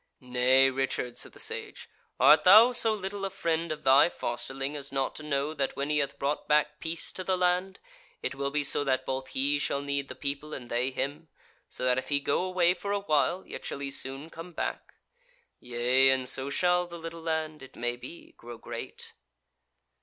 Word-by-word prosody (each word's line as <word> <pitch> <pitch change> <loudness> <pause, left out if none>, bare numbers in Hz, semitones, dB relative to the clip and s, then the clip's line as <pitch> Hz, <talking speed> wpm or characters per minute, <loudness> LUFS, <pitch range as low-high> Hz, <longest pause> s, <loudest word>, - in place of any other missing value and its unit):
"Nay, 130 +1 +3
Richard," 130 -2 -2
said - - -7
the - - -14
Sage, - - -4 0.3
"art 150 - +7
thou 215 +6 +9
so 230 -2 +2
little 200 -1 -4
a 195 - -1
friend 170 -3 -1
of 155 0 -5
thy 135 +5 +6
fosterling 135 +1 -4
as 140 -1 -5
not 135 -1 -1
to - - -8
know 150 0 -1
that 140 -3 -2
when 140 +2 -2
he 150 - +2
hath 140 - -2
brought 140 +2 -2
back 150 0 +2
peace 165 0 -2
to 185 - -6
the 185 0 0
land, 180 +1 +1 0.4
it - - -2
will 140 +1 -2
be 145 +1 -1
so 145 - +1
that 130 -2 0
both 130 0 -3
he 140 +3 0
shall 140 0 -1
need 140 -1 -2
the - - -7
people, 145 +2 -4
and 120 -2 -9
they 120 +2 +1
him, 140 +4 -4 0.4
so 125 - -5
that 125 0 +3
if - - -9
he 145 -1 +2
go 145 - 0
away 180 -1 +3
for 200 +2 -5
awhile, 180 -3 +1
yet - - -8
shall - - -4
he 140 0 -4
soon 135 +4 -4
come 165 +2 -9
back? - - -4 0.6
Yea, 125 +2 +3
and 130 -1 +1
so 135 +1 +1
shall 180 +4 +2
the 170 0 -8
little 165 0 -7
land, 160 -2 -2
it 130 0 -13
may 120 0 -2
be, 165 +7 -11
grow 120 0 -10
great." - - -8
145 Hz, 205 wpm, -29 LUFS, 135-170 Hz, 0.6 s, thou